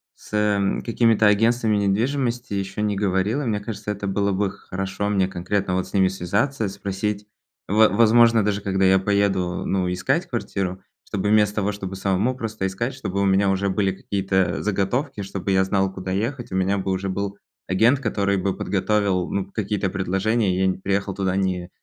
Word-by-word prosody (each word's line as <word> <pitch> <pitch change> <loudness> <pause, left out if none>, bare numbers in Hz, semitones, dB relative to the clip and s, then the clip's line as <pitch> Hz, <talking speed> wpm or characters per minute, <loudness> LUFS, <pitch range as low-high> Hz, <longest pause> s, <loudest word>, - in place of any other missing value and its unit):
с, - - -17
эм, 105 -2 +1
какими-то 115 -2 +2
агентствами 110 +1 +3
недвижимости 120 +4 0
ещё 100 +1 -3
не 105 -1 0
говорил. 100 +5 0
И - - -3
мне 105 -3 0
кажется, 105 0 -5
это 100 0 -4
было 100 +1 0
бы 95 0 0
хорошо 95 +2 -4
мне 95 -2 +2
конкретно, 95 +1 -2
вот, 95 0 -1
с - - -16
ними 95 -2 +4
связаться, 100 +7 -1
спросить. 100 +1 -3 0.4
Во 110 +2 +5
возможно, 115 +2 +5
даже 105 0 0
когда 95 -1 +1
я 95 0 +5
поеду, 95 -3 0
э, - - -7
ну, 90 -2 0
искать 90 - 0
квартиру, 95 -6 -3 0.3
чтобы 105 0 -1
вместо 105 -1 +3
того, 105 -1 0
чтобы 95 -2 -6
самому 100 +6 0
просто 110 -5 -4
искать, 115 +8 -3
чтобы 100 -7 -3
у - - +2
меня 95 0 +3
уже 95 +1 +1
были 95 0 +1
какие-то, 95 0 -3 0.2
э, - - -5
заготовки, 105 +3 -1
чтобы 95 0 -4
я 95 0 +4
знал, 95 0 0
куда 95 0 -5
ехать, 120 +6 -2
у - - -3
меня 95 +2 +1
бы 95 0 -2
уже 95 +1 -2
был 100 +1 -3 0.3
агент, 115 +9 +3
который 100 -5 0
бы 95 0 -1
подготовил, 100 -2 0
ну, 100 -1 -1
какие-то 105 -2 -1
предложения, 95 +2 0
и 95 - -1
я 95 - +3
не 95 - 0
переехал 100 +1 -1
туда 95 -1 -1
не 95 -2 -1
100 Hz, 190 wpm, -23 LUFS, 95-105 Hz, 0.4 s, Во